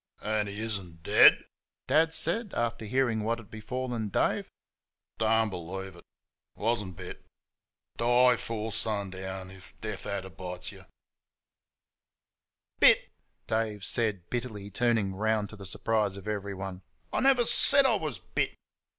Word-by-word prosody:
"An' 105 -1 0
'e 100 - -7
ishn't 90 -7 -6
dead?" - - +7 0.4
Dad 160 +4 +3
said, 200 +6 0
after 115 -1 -1
hearing 120 -1 +1
what 115 +2 0
had 115 -4 -13
befallen 115 0 -4
Dave. - - 0 0.7
"Don' 110 -1 +3
b'leevsh 95 +1 -6
id 85 - -15 0.5
wuzhn't 105 -4 -1
bit. - - -8 0.7
Die 120 +1 +5
'fore 110 -1 -4
shun'own 105 -2 -1 0.4
ifsh 95 0 -15
desh - - -5
ad'er 95 -1 -4
bish 90 +1 -7
'm." - - -14 1.9
"Bit!" - - +6 0.3
Dave 110 -3 -1
said 105 -7 +2
bitterly, 110 -5 -4
turning 110 -3 +1
round 105 +1 0
to - - -9
the 100 -2 -6
surprise 105 0 0
of 100 +1 -10
everyone. 95 -2 -4 0.3
"I - - +1
never 265 -2 +5
said 240 +3 +4
I 255 - +4
was 155 - -2
BIT. 90 0 -2
110 Hz, 135 wpm, -29 LUFS, 95-120 Hz, 1.9 s, dead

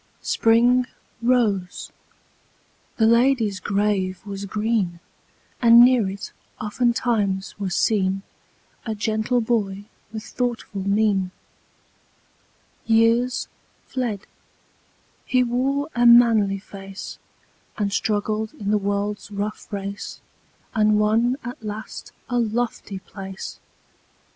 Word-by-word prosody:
Spring 245 +2 +3 0.3
rose; 220 -7 +1 1.1
the 225 - +4
lady's 235 -3 +3
grave 200 -2 0
was 200 -1 -5
green; 210 -4 -1 0.6
And 235 -1 +8
near 245 -6 +3
it, 195 +1 -7 0.3
oftentimes, 215 -3 0
was 190 -3 -2
seen 195 -3 +1 0.6
A 220 -2 -3
gentle 220 +3 0
boy 205 -4 -1 0.3
with 220 -1 -6
thoughtful 235 -6 -3
mien. 200 -1 +1 1.6
Years 230 +2 +3 0.4
fled; 235 -6 -3 1.0
he 255 0 +2
wore 265 +4 0
a 240 0 +4
manly 225 -4 +6
face, 195 0 -9 0.6
And 200 -2 -1
struggled 215 +1 -1
in 205 -1 -3
the 210 - +3
world's 205 +1 -2
rough 210 +2 -5
race, 200 0 -5 0.5
And 215 -1 +3
won 225 +4 +2
at 240 +1 -7
last 215 0 -7 0.2
a 245 -1 0
lofty 230 -2 -2
place. 190 0 -8
215 Hz, 100 wpm, -23 LUFS, 200-235 Hz, 1.6 s, And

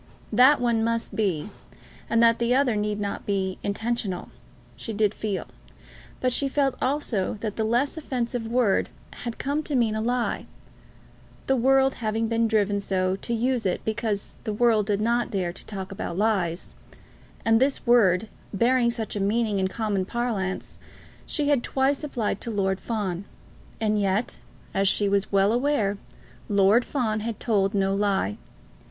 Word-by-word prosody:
That 255 +6 +6
one 235 -2 +1
must 230 0 -1
be, 195 -3 -1 0.6
and 230 0 +3
that 230 0 +5
the 235 +1 +2
other 260 -4 +3
need 210 0 -1
not 200 -1 -3
be, 190 -2 -1
intentional, 205 -3 -2 0.5
she 225 - -6
did 210 0 +2
feel; 210 -4 -3 0.7
but 255 -1 +1
she 275 +1 +1
felt 275 -1 +1
also 255 -9 0
that 215 -3 -3
the 220 - -1
less 240 +7 +1
offensive 245 -5 -3
word 230 -4 +2 0.2
had 235 -2 -6
come 285 +3 -1
to 295 -2 -3
mean 230 -4 +2
a 220 - -1
lie, 245 +1 -1 1.0
the 270 - +2
world 265 +2 +4
having 220 +1 0
been 230 0 +1
driven 205 -2 +1
so 185 -1 0
to 235 - -5
use 240 +1 +1
it 185 - -1
because 220 -2 -2
the 215 - -2
world 220 -2 +3
did 205 -1 0
not 235 +2 +1
dare 180 -4 -2
to - - -8
talk 195 -3 -6
about 180 -3 -5
lies; 190 -5 0 0.7
and 225 +1 +4
this 270 +1 +1
word, 225 -5 +4 0.2
bearing 235 +4 +3
such 230 -3 -3
a - - -1
meaning 210 +1 +1
in 190 - +1
common 205 -1 -1
parlance, 205 -3 -3 0.5
she 295 -2 0
had 285 -4 +3
twice 270 +3 0
applied 245 -7 -2
to - - -4
Lord 195 -3 0
Fawn. 200 -5 -3 0.6
And 215 -2 +1
yet, 195 +3 -1 0.3
as 195 0 +2
she 205 +1 +2
was 200 0 0
well 200 +2 +3
aware, 240 -6 +1 0.5
Lord 205 +4 +4
Fawn 225 -6 -1
had 220 0 -4
told 205 -3 +1
no 195 -1 +2
lie. 205 +1 0
220 Hz, 165 wpm, -25 LUFS, 200-240 Hz, 1.0 s, That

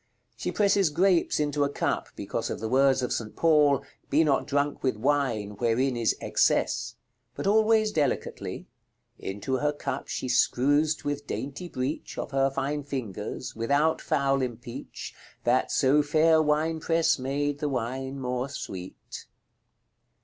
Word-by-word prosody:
She - - -3
presses 200 -3 +3
grapes 175 +2 +2
into 145 -1 +1
a 140 - +1
cup, - - -1
because - - -3
of - - -4
the 110 - -3
words 130 +1 +3
of 125 - -1
St. 110 -2 -4
Paul, 150 -4 +4 0.3
"Be 155 +3 +4
not 145 -3 +1
drunk 145 0 0
with 130 -5 0
wine, 125 -5 0
wherein 125 +2 +1
is 115 -2 +1
excess;" - - +1 0.4
but - - -5
always 215 +1 +4
delicately, 145 -8 -2 0.5
"Into 105 +7 -3
her 150 +3 +1
cup 145 - -4
she - - -3
scruzd 145 +5 +2
with 145 0 -3
daintie 145 +6 -5
breach 130 +4 -4
Of - - -4
her 135 0 +2
fine 140 +2 -2
fingers, 120 -3 -5
without 140 +8 +1
fowle 140 -3 +1
empeach, 120 -1 -6 0.3
That 125 +2 +2
so 140 +2 +4
faire 155 +2 +4
winepresse 160 +1 +1
made 145 +2 -1
the 150 - -1
wine 130 +2 -3
more 125 +1 -2
sweet." 95 -8 -8
140 Hz, 140 wpm, -27 LUFS, 130-150 Hz, 0.5 s, Paul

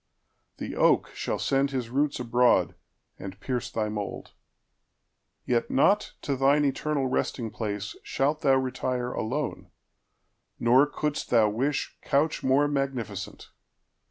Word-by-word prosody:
The - - -5
oakShall - - +1
send 135 0 +1
his 125 -4 -4
roots 145 +2 0
abroad, 125 0 +3 0.5
and 95 0 -8
pierce 125 0 -3
thy 110 -1 -1
mould. 105 -1 -5 1.1
Yet 120 -2 0
not 200 +10 +3
to 140 - -1
thine 140 +3 +3
eternal 140 0 0
resting 125 -3 -1
placeShalt 110 +7 -2
thou 135 -4 +4
retire 130 -1 -1
alone, 140 +7 -3 0.9
nor 125 +5 +5
couldst 150 0 -3
thou 110 -3 +4
wishCouch 140 +4 -1
more 135 +3 +3
magnificent. 135 -6 -4
130 Hz, 110 wpm, -27 LUFS, 120-140 Hz, 1.1 s, nor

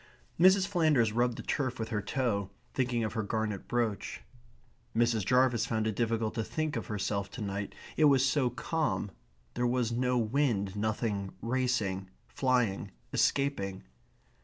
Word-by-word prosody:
Mrs. 190 +2 +6
Flanders 155 - +3
rubbed 120 +1 +1
the - - -6
turf 130 -4 -1
with 110 -1 -4
her 105 -2 -1
toe, 100 -3 -1 0.2
thinking 125 -3 0
of 110 - -2
her 115 - -1
garnet 110 -1 -2
brooch. 115 -5 -1 0.8
Mrs. 115 -2 +3
Jarvis 125 +1 +3
found 110 -2 0
it 110 -2 -1
difficult 115 -1 0
to 115 - -1
think 155 +5 -2
of 115 - -3
herself 100 -1 -2
to 100 - -8
night. 100 0 -4 0.2
It 155 - +5
was 135 -2 +5
so 135 -2 +2
calm. 150 -4 -1 0.4
There 120 0 0
was 120 -1 +1
no 125 +1 +1
wind; 110 -5 +1
nothing 105 -2 -1
racing, 115 -6 -1 0.2
flying, 125 -7 +1 0.2
escaping. 100 -9 +1
115 Hz, 150 wpm, -31 LUFS, 105-130 Hz, 0.8 s, Mrs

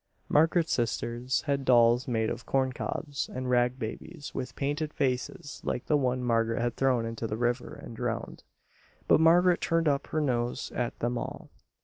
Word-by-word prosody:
Margaret's 160 +2 +3
sisters 120 +1 -1
had 140 -2 -1
dolls 120 -1 +4
made 110 -3 0
of - - -5
corncobs, 135 +2 -1
and 130 0 -3
rag 125 +1 +2
babies 145 +7 -7
with 130 0 -5
painted 145 +2 -2
faces 130 +1 -2
like 125 - -2
the 150 - +2
one 125 -3 +1
Margaret 115 -1 +1
had 120 0 -1
thrown 130 -4 +2
into 115 0 -4
the 110 - -3
river 120 +1 -1
and 115 - -10
drowned; 115 0 -4 0.6
but - - +5
Margaret 175 +2 +5
turned 165 -1 +1
up 140 -1 +1
her 155 - -1
nose 120 -5 -1
at 120 -1 -2
them 120 0 -1
all. - - -7
125 Hz, 165 wpm, -29 LUFS, 120-145 Hz, 0.6 s, but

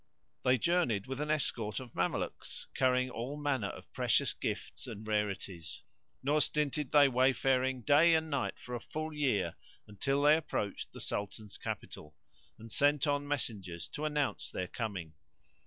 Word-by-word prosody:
They 130 0 +5
journeyed 125 - +2
with 135 +2 -4
an 150 - -2
escort 115 -8 0
of 125 -3 -9
Mamelukes[FN#137] - - -2
carrying 130 -1 +3
all 125 +5 -4
manners 135 -8 0
of - - -14
precious - - +3
gifts - - -4
and 110 -2 -7
rarities, 100 -5 -2 0.4
nor 150 +3 +3
stinted 150 -1 0
they 145 -1 +7
wayfaring 130 0 +2
day 155 +5 +6
and 160 0 +1
night 140 -4 -1
for 125 - -9
a 120 - -1
full 155 +6 -5
year 105 - +1 0.3
until 135 +7 0
they 150 +1 +8
approached 105 -10 -3
the - - -9
Sultan's 100 0 -4
capital, 75 0 -6 0.4
and 115 0 -11
sent 145 +3 +3
on 145 -1 0
messengers 100 -11 -2
to 150 - -4
announce 150 -2 -1
their 90 - -3
coming. 95 -8 -4
130 Hz, 155 wpm, -33 LUFS, 105-145 Hz, 0.4 s, they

